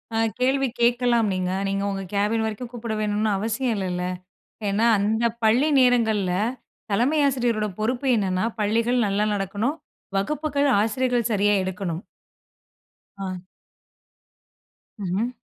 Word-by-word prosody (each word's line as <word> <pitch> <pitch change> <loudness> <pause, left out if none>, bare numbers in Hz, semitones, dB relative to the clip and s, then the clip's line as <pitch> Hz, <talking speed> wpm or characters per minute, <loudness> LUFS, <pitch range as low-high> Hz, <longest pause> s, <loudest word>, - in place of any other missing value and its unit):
அ - - +1 0.2
கேள்வி 265 +1 +2
கேக்கலாம் 240 -2 +3
நீங்க. 185 0 -1 0.2
நீங்க 195 0 -1
உங்க 195 0 -3
கேபின் 210 +3 +1
வரைக்கும் 225 +3 -5
கூப்பட 230 -2 -4
வேணுன்னு 210 0 0
அவசியம் 230 +4 -1
இல்லல்ல. 180 -2 -2 0.6
ஏன்னா, 210 +4 +2
அந்த 220 +3 +1 0.2
பள்ளி 245 +7 +4
நேரங்கள்ல 220 -7 +3 0.6
தலைமை 255 +9 +2
ஆசிரியரோட 235 -5 0
பொறுப்பு 250 +5 -1
என்னன்னா, 185 -1 0 0.2
பள்ளிகள் 230 +3 +2
நல்லா 205 +2 +1
நடக்கணும், 205 - -1 0.4
வகுப்புகள் 285 +6 0
ஆசிரியர்கள் 245 +1 0
சரியா 205 0 +3
எடுக்கணும். 185 -2 -4 1.2
ஆ. 185 -2 -5 1.6
ம்ஹ்ம். 200 +7 -1
220 Hz, 110 wpm, -24 LUFS, 195-245 Hz, 1.6 s, பள்ளி